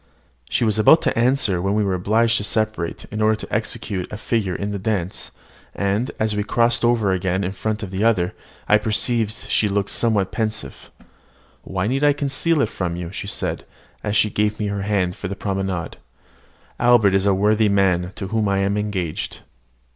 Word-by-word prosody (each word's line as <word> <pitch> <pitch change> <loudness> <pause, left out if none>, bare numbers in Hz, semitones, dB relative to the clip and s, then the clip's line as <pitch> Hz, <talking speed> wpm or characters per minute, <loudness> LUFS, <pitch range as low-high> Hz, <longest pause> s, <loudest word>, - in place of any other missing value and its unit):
She - - +1
was 110 -1 +1
about 155 +10 +6
to - - +1
answer, 115 -6 +2
when 100 +2 0
we 105 - +2
were 100 -2 0
obliged 110 +5 +2
to - - -2
separate, 110 -5 -2
in 110 0 -3
order 110 0 +4
to 110 - -9
execute 105 -3 -2
a 105 - -5
figure 105 -5 -1
in 100 +3 -3
the 100 - -3
dance; 95 -3 -2 0.5
and, 100 +6 0
as 110 -1 +1
we 105 - 0
crossed 115 +2 +2
over 115 -4 +3
again 95 +1 0
in 95 - -2
front 110 +2 -3
of 95 -1 -6
each 95 - -2
other, 100 -6 +2 0.3
I 105 - +5
perceived 110 +1 0
she 110 -1 0
looked 100 0 -1
somewhat 105 -5 +1
pensive. 110 -1 -4 0.7
"Why 95 0 -3
need 135 +6 0
I 145 0 +5
conceal 145 +3 0
it 110 - -1
from 90 -2 -3
you?" 85 -1 -5
she 100 - -6
said, - - -2 0.4
as 105 0 -1
she 105 0 +3
gave 105 0 0
me 105 -1 -1
her 100 -1 -2
hand 95 -3 0
for 100 - -5
the 100 - -4
promenade. 95 -3 -3 0.8
"Albert 120 -5 +5
is 95 +1 +2
a 100 - +4
worthy 105 +2 +3
man, 95 -3 +2
to 95 -3 -5
whom 110 -2 0
I 100 - +1
am 100 +1 +1
engaged." 95 -6 -3
105 Hz, 195 wpm, -21 LUFS, 95-110 Hz, 0.8 s, about